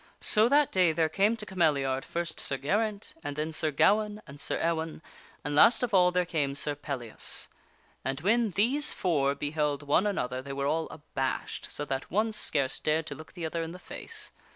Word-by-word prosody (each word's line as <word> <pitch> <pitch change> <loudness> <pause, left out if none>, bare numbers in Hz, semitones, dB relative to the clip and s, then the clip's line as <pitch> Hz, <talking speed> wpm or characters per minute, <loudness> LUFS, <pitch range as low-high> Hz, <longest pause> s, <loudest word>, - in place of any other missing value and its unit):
So 220 +2 +4
that 290 +1 +4
day 180 -4 +3
there 160 -1 +2
came 205 +7 +2
to 215 - -5
Cameliard, 145 -8 +1
first 170 -1 -3
Sir 135 - 0
Geraint 205 - -1
and 145 - -4
then 155 +2 -3
Sir 155 0 +1
Gawaine 210 +8 +2
and 140 -1 -11
Sir - - 0
Ewaine, 160 -1 -1 0.4
and 145 - -3
last 230 - +6
of 240 -3 -1
all 180 -2 +6
there 180 0 +1
came 145 -5 -1
Sir 145 +1 0
Pellias. 135 -6 -4 0.6
And 135 +1 -2
when 225 +5 +3
these 250 - +1
four 140 -6 +1
beheld 145 0 -1
one 150 +8 +3
another 130 -10 -2
they 140 +1 -7
were 140 0 -2
all 160 +3 0
abashed 135 -4 -4
so 145 - -3
that 135 -2 -3
one 215 +5 +1
scarce 140 -9 +1
dared 155 +1 +1
to 150 - -5
look 155 +3 -12
the 175 -3 -5
other 165 +1 -2
in 165 +1 -5
the - - -8
face. 180 - -5
160 Hz, 200 wpm, -29 LUFS, 145-200 Hz, 0.6 s, last